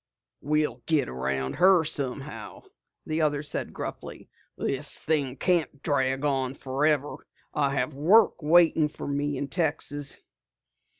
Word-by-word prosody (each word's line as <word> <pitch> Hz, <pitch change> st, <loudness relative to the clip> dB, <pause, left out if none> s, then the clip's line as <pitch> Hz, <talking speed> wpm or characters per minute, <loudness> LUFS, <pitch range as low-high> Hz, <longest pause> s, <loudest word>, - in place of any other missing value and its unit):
"We'll 150 Hz, +1 st, 0 dB
get 155 Hz, -3 st, +2 dB
around 65 Hz, +1 st, -3 dB
her 185 Hz, -2 st, +6 dB
somehow," 135 Hz, -5 st, -4 dB, 0.4 s
the 155 Hz, +1 st, -1 dB
other 150 Hz, -1 st, +1 dB
said 150 Hz, -, -3 dB
gruffly. -, -, -7 dB, 0.3 s
"This 140 Hz, +1 st, -2 dB
thing 145 Hz, -5 st, -1 dB
can't 165 Hz, -4 st, 0 dB
drag 135 Hz, -1 st, 0 dB
on 135 Hz, -2 st, 0 dB
forever. 145 Hz, +2 st, 0 dB, 0.4 s
I 140 Hz, -2 st, +1 dB
have 135 Hz, +2 st, -1 dB
work 180 Hz, +12 st, +4 dB
waiting 160 Hz, 0 st, +4 dB
for -, -, -8 dB
me 145 Hz, 0 st, -1 dB
in 140 Hz, -, -3 dB
Texas." 145 Hz, -2 st, -2 dB
145 Hz, 125 wpm, -27 LUFS, 135-155 Hz, 0.4 s, her